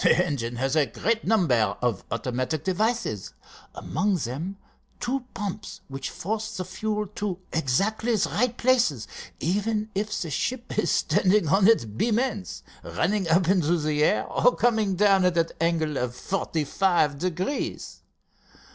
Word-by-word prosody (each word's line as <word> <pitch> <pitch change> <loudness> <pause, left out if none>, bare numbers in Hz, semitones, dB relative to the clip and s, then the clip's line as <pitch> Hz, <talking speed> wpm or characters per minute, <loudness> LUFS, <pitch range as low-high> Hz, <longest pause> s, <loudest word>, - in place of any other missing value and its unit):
The 180 - +4
engine 120 -7 -3
has 135 +4 -1
a 150 -3 +3
great 225 - -1
number 125 - +2
of 120 -6 -1
automatic 130 +6 -2
devices, 190 - -1 0.4
among 200 +1 0
them 160 +7 -4 0.4
two 255 +1 -2
pumps 200 -2 -5
which 135 0 -5
force 220 +3 -4
the 185 - -3
fuel 210 +3 -2
to 200 -4 -3 0.2
exactly 200 - +1
the 205 - +1
right 245 +2 0
places, 235 - +2 0.3
even 210 +5 -1
if 205 +1 -2
the 165 - -4
ship 245 - -3
is - - +1
standing 190 -3 +2
on 195 +4 +5
its 225 - +5
beam 165 - 0
ends, 225 -6 -2 0.2
running 190 -1 -1
up 170 +1 +3
into 175 -3 +3
the 150 -1 0
air - - +2
or - - +2
coming 220 -5 +2
down 195 -1 +4
at 180 -1 +2
an 165 0 +2
angle 160 -3 +1
of 125 -1 -2
forty 165 -1 -2
five 155 -3 +1
degrees. 185 - -3
185 Hz, 150 wpm, -26 LUFS, 150-215 Hz, 0.4 s, on